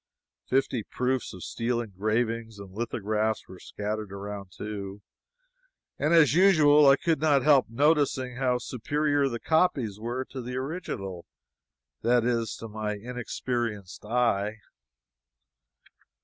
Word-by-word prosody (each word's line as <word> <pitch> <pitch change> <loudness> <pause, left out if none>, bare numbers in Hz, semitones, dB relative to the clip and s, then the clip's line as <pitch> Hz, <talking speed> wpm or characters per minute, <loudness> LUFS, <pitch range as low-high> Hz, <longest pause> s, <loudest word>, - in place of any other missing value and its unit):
Fifty 130 -2 +1
proofs 125 +3 -2
of 90 - -9
steel 120 +1 -1
engravings 110 +1 -2
and 100 -2 -10
lithographs 110 0 -2
were 95 -1 -12
scattered 105 -1 -5
around, 100 -1 -7
too. 100 0 -7 1.0
And 150 +3 +1
as 160 -5 +6
usual, 155 -5 +6
I 135 - +8
could 160 -1 0
not 145 -4 +3
help 140 -5 +5
noticing 135 -1 +1
how 125 -2 +1
superior 145 +4 0
the 120 -2 -4
copies 135 - +1
were 120 +4 -3
to 130 - -5
the 125 +1 -6
original, 130 - -5 0.7
that 120 0 +3
is, 115 -2 0
to 115 - -8
my 105 -1 -3
inexperienced 120 -3 -4
eye. 110 -2 +1
120 Hz, 120 wpm, -27 LUFS, 105-135 Hz, 1.0 s, I